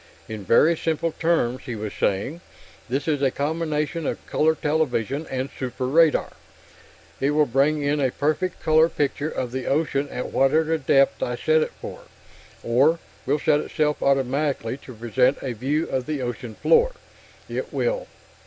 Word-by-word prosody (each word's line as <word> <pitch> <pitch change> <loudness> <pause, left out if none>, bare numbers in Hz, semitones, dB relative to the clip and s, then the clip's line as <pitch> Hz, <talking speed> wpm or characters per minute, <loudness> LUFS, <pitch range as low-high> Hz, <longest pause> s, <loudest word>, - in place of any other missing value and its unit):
"In 110 -2 -6
very 155 - +4
simple 165 +1 -1
terms," 155 -7 0
he 120 - -3
was 105 -1 -5
saying, 115 - -1 0.5
"this 135 +4 -2
is 150 -3 +1
a 135 - +3
combination 150 +1 -2
of - - -4
color 160 +1 +2
television 150 -2 -1
and 130 0 -2
super 125 0 -3
radar. 155 +4 +3 0.9
It 135 - +1
will 150 0 +3
bring 145 +4 +1
in 145 +1 +1
a 135 -2 +2
perfect 155 +7 -2
color 160 +1 +5
picture 145 0 -1
of 125 -5 -4
the 130 0 -4
ocean 145 -1 0
at 125 - -5
whatever 155 +4 +3
depth 135 0 +3
I 125 - -1
set 155 +5 +2
it - - -2
for, - - -7 0.6
or 135 +8 +3 0.3
will 140 +3 +2
set 150 0 +2
itself 150 -1 -1
automatically 135 -2 0
to 130 - -12
present 125 +4 +2
a 130 -3 -2
view 140 +8 -1
of 130 0 -2
the 150 -4 -2
ocean 120 -2 -5
floor. 485 +1 +3 0.5
It - - -4
will...." - - -1
145 Hz, 160 wpm, -24 LUFS, 130-155 Hz, 0.9 s, color